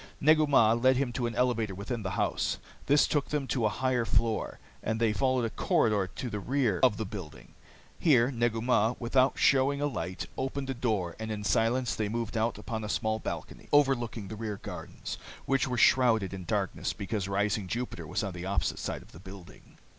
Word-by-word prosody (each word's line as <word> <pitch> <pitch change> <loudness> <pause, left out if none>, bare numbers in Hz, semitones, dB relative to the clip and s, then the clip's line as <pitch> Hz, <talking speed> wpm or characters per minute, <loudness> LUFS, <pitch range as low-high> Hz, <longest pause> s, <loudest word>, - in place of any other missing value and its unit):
Negu 155 +1 +5
Mah 115 -6 +5
led 130 +2 +3
him 130 -3 -1
to 120 -1 -1
an 115 - -5
elevator 115 -5 +1
within 110 +5 -4
the 95 - -3
house. - - 0 0.3
This 145 +1 +5
took 145 -2 0
them 150 -2 -1
to 115 -4 +1
a - - +1
higher 125 +2 0
floor, 115 -1 0 0.2
and 110 +1 -2
there 115 -1 +3
they - - 0
followed 130 0 +1
a 115 - -3
corridor 105 -4 +1
to 130 - -4
the 105 -3 -3
rear 120 -4 0
of 105 - +4
the 110 - -2
building. 75 - -9 0.5
Here 130 -6 +4
Negu 120 -2 0
Mah, 120 -1 +2
without 130 +2 +2
showing 140 +1 +3
a 145 - 0
light, 95 -10 -3
opened 135 0 -2
a - - -1
door, 110 -9 -1
and 110 0 -4
in 105 -1 -4
silence 115 +3 +1
they 110 -2 -1
moved 115 0 -3
out 115 0 0
upon 110 +1 -5
a 105 - -4
small 110 0 0
balcony - - -6
overlooking 120 -7 +2
the 110 - -6
rear 110 -2 -4
gardens, - - -7 0.3
which 135 0 +1
were 125 -1 -2
shrouded 115 -5 +4
in 95 -2 -6
darkness - - -1
because 100 -1 -3
rising 100 0 0
Jupiter 115 -7 -4
was 90 +6 -2
on 100 -2 -3
the 90 0 -7
opposite 95 -6 -1
side - - -4
of - - -20
the 80 - -13
building. 95 -1 -13
115 Hz, 205 wpm, -29 LUFS, 105-130 Hz, 0.5 s, Negu